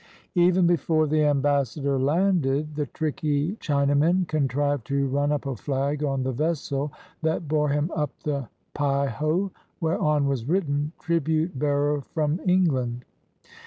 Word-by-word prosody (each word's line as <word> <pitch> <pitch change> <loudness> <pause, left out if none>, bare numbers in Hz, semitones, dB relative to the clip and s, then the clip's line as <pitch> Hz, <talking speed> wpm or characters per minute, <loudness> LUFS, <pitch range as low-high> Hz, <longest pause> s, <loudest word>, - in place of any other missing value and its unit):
Even 180 0 +4
before 165 -2 +2
the 155 0 +2
ambassador 140 -1 +1
landed, 150 -1 +1
the 150 -1 -2
tricky 150 +2 -1
Chinamen 145 +5 +2
contrived 145 -3 0
to 140 0 +1
run 145 +2 0
up 145 -1 -1
a 135 -2 -2
flag 140 +5 -2
on 135 -2 0
the 130 - -1
vessel 145 0 -1 0.3
that 160 0 -1
bore 150 0 +1
him 150 +4 0
up 150 -2 0
the 140 -5 -2 0.2
Peiho, 145 +6 0 0.3
whereon 150 -3 +1
was 135 -2 -2
written 150 -5 0
"Tribute 160 -2 0
bearer 145 0 +1
from 155 +1 +1
England." 130 -10 +1
145 Hz, 130 wpm, -25 LUFS, 140-160 Hz, 0.3 s, Even